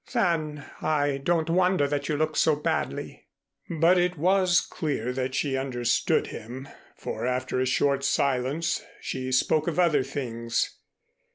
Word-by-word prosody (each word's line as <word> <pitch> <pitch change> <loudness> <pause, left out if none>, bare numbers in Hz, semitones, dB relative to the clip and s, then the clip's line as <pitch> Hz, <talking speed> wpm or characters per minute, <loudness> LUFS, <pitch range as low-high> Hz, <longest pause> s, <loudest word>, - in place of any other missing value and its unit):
"Then 160 - 0 0.2
I 145 -3 +1
don't 165 +3 +1
wonder 180 -3 +3
that 145 0 -2
you 150 - 0
looked 155 +1 0
so 155 - +4
badly." 150 - -3 0.4
But 170 +3 +4
it 180 0 +1
was 185 +2 +4
clear 130 -6 -3
that 130 0 -2
she 135 0 0
understood 130 -3 +1
him, 125 +5 -8 0.3
for 115 +3 -4
after 130 0 -1
a 130 - +1
short 140 +1 +1
silence 140 +4 0 0.2
she 130 -1 -4
spoke 150 +5 +2
of 170 - -1
other 170 -6 +4
things. 115 -4 -2
145 Hz, 145 wpm, -26 LUFS, 130-165 Hz, 0.4 s, so